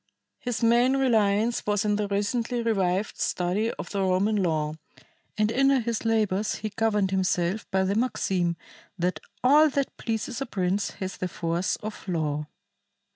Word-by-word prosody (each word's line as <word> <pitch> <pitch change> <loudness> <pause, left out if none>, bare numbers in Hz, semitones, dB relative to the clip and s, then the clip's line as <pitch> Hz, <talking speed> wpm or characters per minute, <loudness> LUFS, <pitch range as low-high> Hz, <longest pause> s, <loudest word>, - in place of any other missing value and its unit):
His 245 -3 -3
main 240 +3 +4
reliance 225 -3 +2
was 210 0 +1
in 210 0 +2
the 210 0 -1
recently 230 +4 -1
revived 195 -3 0
study 185 +5 0
of - - -8
the 200 - -1
Roman 190 +3 +2
law, 155 -5 0 0.6
and 215 0 +2
in 270 +3 +3
a 275 -1 +4
his 235 -1 -2
labors 215 -2 +1
he 215 - -4
governed 210 -2 +1
himself 185 +1 0
by 190 -1 +2
the 190 +1 +1
maxim 190 -7 0 0.4
that 175 -2 -1 0.2
"all 300 +4 +6
that 280 -1 -2
pleases 230 +2 -3
a 275 - -2
prince 190 -1 0
has 190 -1 -5
the 185 - -2
force 170 +1 -1
of 215 -2 -8
law." 150 -4 -1
205 Hz, 160 wpm, -26 LUFS, 185-230 Hz, 0.6 s, all